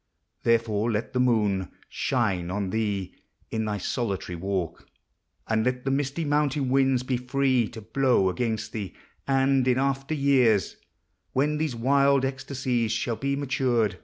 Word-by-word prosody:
Therefore 115 -1 +1
let 110 +1 -2
the 125 - 0
mOOD 105 -7 +2 0.2
Shine 100 -9 -1
on 95 0 -2
thee 100 -4 -2 0.4
in 110 -1 -1
thy 105 -1 -2
solitary 100 -3 -3
walk; 90 -2 -3 0.6
And 110 0 +1
let 125 +1 -1
the 135 - +1
misty 140 +4 -1
mountain 145 -2 +1
winds 135 -1 +3
1m 125 -1 -3
free 130 -4 +2
To 115 0 -10
blow 115 -2 +2
against 110 +2 -2
thee: 100 -5 -5 0.3
and, 135 -1 +3
in 125 -1 +3
after 135 +2 0
years, 130 - +3 0.6
When 150 +3 +1
these 155 -5 -1
wild 140 +2 +3
ecstasies 125 -3 -2
shall 115 +1 -1
be 140 +3 -1
matured 140 -1 -4
16 135 -1 +1
POEMS 120 -1 +2
OF 110 -2 +3
NATURE. - - -13
125 Hz, 160 wpm, -26 LUFS, 110-135 Hz, 0.6 s, winds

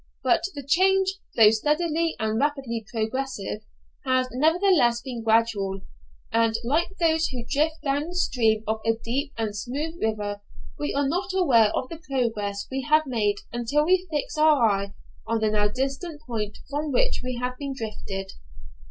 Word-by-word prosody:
But 260 +6 +3
the 285 - -6
change, 380 +6 +3 0.2
though 215 -2 +8
steadily 315 +7 +1
and 220 0 0
rapidly 270 -5 -1
progressive, 220 -2 -3 0.4
has 255 -1 +2
nevertheless 310 -3 +3
been 245 -2 -6
gradual; 220 -4 +1 0.5
and, 225 -1 +2
like 320 +10 0
those 320 -1 +3
who 245 -2 -6
drift 310 +2 0
down 285 +1 0
the 350 - -7
stream 225 -11 +2
of 220 +1 -1
a 225 - +3
deep 260 +6 -3
and 220 -2 -2
smooth 290 +9 -4
river, 205 -2 -2 0.4
we 295 - -1
are 285 0 +2
not 375 +5 -2
aware 245 - +5
of 255 - -2
the 330 - -7
progress 215 -6 -1
we 265 +1 -1
have 310 0 +5
made 220 -6 +1 0.2
until 240 +6 +1
we 370 +2 +2
fix 305 0 -3
our 305 -5 +5
eye 200 -1 -1 0.3
on 230 - +1
the 215 -1 +1
now 210 -1 +2
distant 275 - -3
point 215 -4 -3
from 290 +1 -3
which - - +1
we 255 -1 -3
have 250 0 -2
been 280 -2 -4
drifted. 195 -4 -5
255 Hz, 165 wpm, -25 LUFS, 220-305 Hz, 0.5 s, though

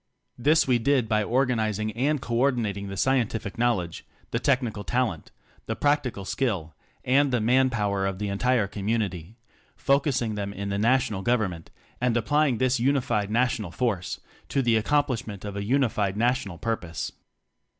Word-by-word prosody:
This 150 +6 +3
we 125 -2 +3
did 130 0 +2
by 110 -1 +2
organizing 110 -3 0
and 140 +7 0
co 120 - -5
ordinating 115 -7 0
the 100 0 -6
Scientific 115 -5 0
Knowledge, 100 -9 0 0.3
the - - 0
Technical 125 -7 0
Talent, 120 -10 -1 0.4
the 110 - -2
Practi 145 -2 +1
cal 100 -2 -8
Skill 95 - -2 0.3
and 140 +2 +3
the 125 - +2
Man 130 +4 +3
Power 100 -4 0
of 95 -1 -3
the 105 +1 -3
entire 115 +3 +1
Community: 100 -2 -3 0.4
focusing 135 -5 +1
them 100 -1 -4
in 100 0 -4
the 100 0 -1
National 120 -3 +2
Government, 95 -7 -1 0.3
and 125 -1 +2
apply 145 +7 +2
ing 125 -4 0
this 130 0 +1
Unified 125 -6 +1
National 115 -3 0
Force 105 -4 -2 0.3
to 135 - +1
the 120 -2 +3
accomplishment 115 -4 0
of 100 -1 -5
a 100 - -3
Unified 105 -5 +1
National 115 -6 0
Purpose. 90 -7 -3
115 Hz, 160 wpm, -26 LUFS, 100-130 Hz, 0.4 s, This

